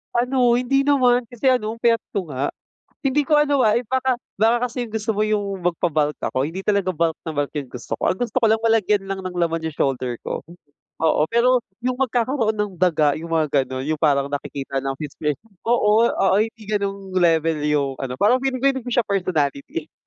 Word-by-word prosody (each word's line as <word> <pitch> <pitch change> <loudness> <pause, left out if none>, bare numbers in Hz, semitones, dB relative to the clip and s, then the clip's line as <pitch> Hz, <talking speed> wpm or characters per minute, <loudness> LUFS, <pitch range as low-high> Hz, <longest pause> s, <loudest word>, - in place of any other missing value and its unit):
Ano 245 0 +3
hindi 275 +3 +1
naman 250 -4 +3
kasi 245 +3 0
ano 225 -3 0
ang - - -18
payat 230 -1 +4 0.2
ko 180 -6 -2
nga. 135 +2 -1 0.5
Hindi 280 +1 +1
ko 300 +1 +3
ano, 290 -2 +3
ah, 215 -1 +4
if 240 - -7
baka 260 +1 0 0.2
baka 235 +4 +2
kasi 245 +1 -4
yung 230 -3 -7
gusto 220 +1 -2
mo 210 - 0
yung 205 -3 -1
magpa-bulk 155 -4 0
ako, 130 - -1
hindi 170 +7 -5
talaga 200 -3 +2
bulk 165 -2 0
na 165 - -5
bulk 145 -2 -2
yung 140 -4 -4
gusto 125 - -5
ko. - - -9
Ang 185 - -2
gusto 245 0 -3
ko - - +6
lang 220 - +3
malagyan 215 -3 +2
lang 195 0 -4
ng 185 -1 -5
laman 165 -1 0
yung 160 -2 -5
shoulder 130 -3 -1
ko. - - -3 0.6
Oo, 160 -2 +3
pero 245 +2 +3 0.2
yung 255 +1 -1
magkakaroon 240 -2 +1
ng 210 -1 -2
daga 155 -5 +3
yung 165 - -7
mga, 150 -3 +2
ganon. 130 0 -4
Yung 155 +1 -2
parang 140 -2 +2
nakikita 140 -1 -3
na 135 0 -3
fitspi 150 0 -3 0.3
oo, 230 -1 +4
oo. 195 0 +2
Hindi 225 0 -3
ganong 200 -2 -3
level 165 -3 +2
yung 145 -2 +1
ano, 130 -1 -4
parang 240 - +3
feeling 265 -1 -1
ko 275 - +5
hindi 265 - -4
ko 245 - -5
siya 245 - +3
personality. 160 -6 -2
200 Hz, 210 wpm, -22 LUFS, 155-240 Hz, 0.6 s, ko